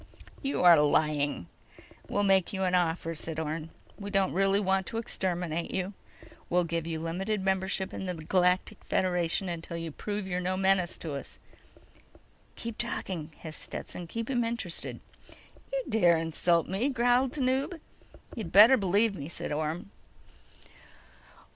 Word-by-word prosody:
"You 275 -8 -1
are 175 -2 +9
lying!" 145 - +1 0.6
"We'll 205 - +1
make 195 -2 +3
you 190 -1 -1
an 185 -1 +1
offer," 165 -2 +1
said 160 0 -5
Orne. 160 0 -3 0.3
"We 200 0 -5
don't 195 -2 +1
really 195 +1 +3
want 190 -1 +1
to 225 - -4
exterminate 175 -6 -2
you. 190 +1 -2 0.6
We'll 180 +1 +3
give 165 -1 -2
you 160 -1 -3
limited 190 +6 -2
membership 190 0 0
in 190 - -4
the 180 - -2
Galactic 180 +5 +1
Federation 180 0 0
until 170 -1 -5
you 165 -1 -5
prove 205 +5 -4
you're 180 -1 -2
no 185 +1 -1
menace 190 -2 +2
to 160 -3 -5
us." 140 - -7 1.2
"Keep 230 -1 -5
talking," 180 -9 -3
hissed 155 -2 -7
Stetson. 175 - -6
"Keep 230 +7 -4
him 240 -2 +2
interested." 230 -7 -3 0.7
"You - - -1
dare 175 -6 +4
insult 165 +1 +1
me!" 205 +9 0
growled 245 0 +2
Tanub. 270 +4 0 0.6
"You - - -7
had 165 - -8
better 220 +7 +9
believe 205 +2 +2
me," 150 -5 -6
said 170 - -5
Orne. 155 +6 -3
185 Hz, 150 wpm, -29 LUFS, 165-205 Hz, 1.2 s, are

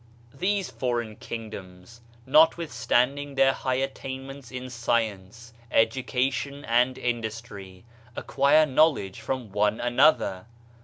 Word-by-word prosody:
These 190 +6 -1
foreign 120 -4 -2
kingdoms, 105 -2 -9 0.2
notwithstanding 145 -3 +2
their 135 0 +4
high 130 -1 -2
attainments 135 0 -5
in 130 0 -7
science, 115 -1 -2 0.2
education 130 +5 0
and 125 +2 +2
in 120 -1 -1
dustry, 105 -4 -8 0.3
acquire 140 +3 +3
knowledge 135 - +1
from 130 -6 -4
one 105 +2 +1
another. 120 -6 +2
125 Hz, 100 wpm, -26 LUFS, 110-135 Hz, 0.3 s, their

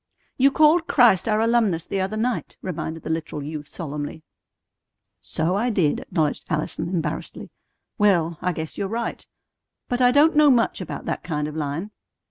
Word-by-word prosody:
"You 270 +2 +5
called 310 +4 +4
Christ 240 -7 +4
our 215 0 +2
alumnus 225 -8 +2
the 195 - -2
other 195 +3 -2
night," 240 +2 -2
reminded 165 -2 -5
the - - -3
literal 160 -2 -3
youth 150 0 -6
solemnly. 150 -1 -6 1.0
"So 165 +4 -1
I 230 +5 +1
did," 180 -10 +1
acknowledged 155 -3 -1
Allison 155 +2 -2
embarrassedly. 165 -3 -4 0.5
"Well, 170 -6 +2
I 180 - 0
guess 160 -1 -6
you're 200 - -1
right. 230 +3 -4 0.6
But 245 0 -1
I 245 - +6
don't 290 +5 +4
know 300 -1 +6
much 240 -4 +2
about - - -6
that - - -3
kind 150 -3 -2
of 150 - -7
line." 155 +6 -3
185 Hz, 165 wpm, -23 LUFS, 160-235 Hz, 1.0 s, I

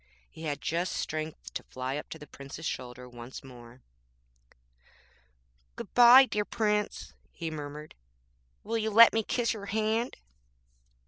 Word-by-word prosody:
He 160 - -9
had 145 -2 -3
just 170 +3 -1
strength 155 - -5
to - - -4
fly 130 +1 -5
up 150 - -6
to - - -7
the 150 - -11
Prince's 140 +3 -10
shoulder 125 -3 -5
once 120 +1 -10
more.'Good - - -18
bye, 245 +2 +9
dear 210 -4 -1
Prince!' 210 -1 -1 0.2
he 165 -2 -5
murmured, 150 0 -7 0.7
'will 225 +2 -2
you 220 0 -1
let 230 +2 +8
me 225 - +2
kiss 235 +2 0
your 200 -2 -8
hand?' 220 +3 -1
145 Hz, 135 wpm, -29 LUFS, -, 0.7 s, bye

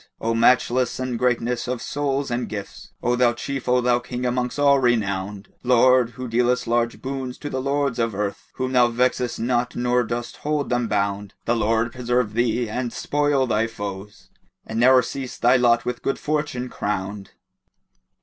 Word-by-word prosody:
O 115 0 0
matchless 125 +2 +3
in 130 -1 -2
greatness 120 0 0
of 125 -1 -2
soul 140 +1 -1
and 120 +1 -2
gifts, 100 -2 -7
* - - -39
O 120 +1 +2
thou 120 -1 +3
Chief, 135 +2 -4
O 125 0 +4
thou 120 0 +2
King 125 0 -5
amongst 125 +1 -1
all 140 -1 +5
renowned: 100 -5 -1
Lord, 125 0 +4
who 130 0 -5
dealest 125 +2 +1
large 120 0 0
boons 130 -1 -4
to 145 - -6
the 130 - -2
Lords 140 -2 0
of 115 -3 0
Earth, 100 0 -3
* - - -51
Whom 130 0 -2
thou 125 -2 +5
vexest 125 0 0
not 120 +1 0
nor 125 0 +2
dost 120 +1 -4
hold 150 -2 -2
them 120 -1 +1
bound 100 -1 -2
The 120 - +2
Lord 115 +1 +1
preserve 125 -3 -1
thee, 120 +1 +1
and 120 +2 -3
spoil 145 -1 +1
thy 115 -2 +1
foes, 100 -2 -8 0.2
* - - -47
And 110 0 -3
ne'er 130 +1 +6
cease 130 +1 -6
thy 125 +2 +4
lot 120 -1 +3
with 125 0 -3
good 135 - -1
Fortune 150 -4 -2
crowned!" 100 -3 -4
120 Hz, 185 wpm, -23 LUFS, 115-130 Hz, 0.2 s, ne'er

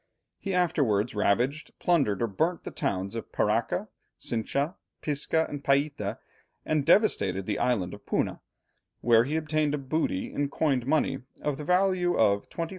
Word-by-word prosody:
He 195 -2 -2
afterwards 125 - +1
ravaged, 120 +9 0
plundered, 135 - +2
or - - +2
burnt 160 - -1
the - - -6
towns 95 +1 -2
of 115 -1 -6
Paraca, - - 0 0.3
Cincha, 140 +8 -1 0.3
Pisca, 155 +2 0
and 145 -1 -6
Païta, 140 -7 +1 0.5
and 155 -3 0
devastated 95 - +3
the 105 0 -2
island 100 -8 0
of 100 - -12
Puna, - - -1 0.6
where 115 0 +5
he 150 +4 -2
obtained 155 -1 0
a - - -2
booty 140 -8 -2
in 145 -1 -1
coined 135 -4 0
money 140 -2 +1 0.2
of 145 -2 -1
the - - -4
value 180 0 +2
of 100 -2 +2
25,760_l. 165 -1 -4
140 Hz, 155 wpm, -28 LUFS, 110-160 Hz, 0.6 s, where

